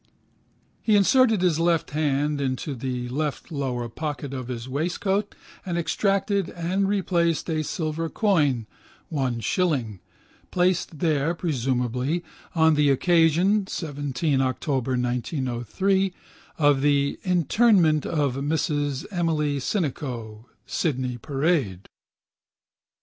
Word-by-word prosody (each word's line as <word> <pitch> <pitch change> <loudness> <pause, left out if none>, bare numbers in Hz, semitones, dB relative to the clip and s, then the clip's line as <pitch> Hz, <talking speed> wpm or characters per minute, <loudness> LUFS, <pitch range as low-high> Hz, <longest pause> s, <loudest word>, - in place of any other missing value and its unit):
He 215 - +3
inserted 220 0 +4
his 170 -3 +2
left 165 -2 +1
hand 145 -1 0
into 135 +2 -2
the 125 -1 -4
left 150 +5 -3
lower 130 -5 -2
pocket 145 +2 -5
of 130 -2 -5
his 120 -1 -5
waistcoat 185 +8 -1 0.3
and 175 -2 -3
extracted 195 +2 0
and 185 +3 -1
replaced 170 -5 +1
a 155 -1 0
silver 160 +1 -3
coin 150 - +1 0.4
(1 130 -7 -1
shilling), 125 - 0 0.5
placed 180 -3 +1
there 160 0 +1
(presumably) 130 0 -1 0.3
on 160 -1 +5
the 150 -1 +3
occasion 175 +7 +3
(17 145 -3 -1
October 130 0 -1
1903) 130 - -1 0.4
of 145 -3 +3
the 140 -1 +2
interment 180 -2 +3
of 145 -5 0
Mrs 145 -1 -1
Emily 155 -5 0
Sinico, 125 - -3 0.2
Sydney 130 -6 -2
Parade. 135 - -1
150 Hz, 105 wpm, -25 LUFS, 130-175 Hz, 0.5 s, on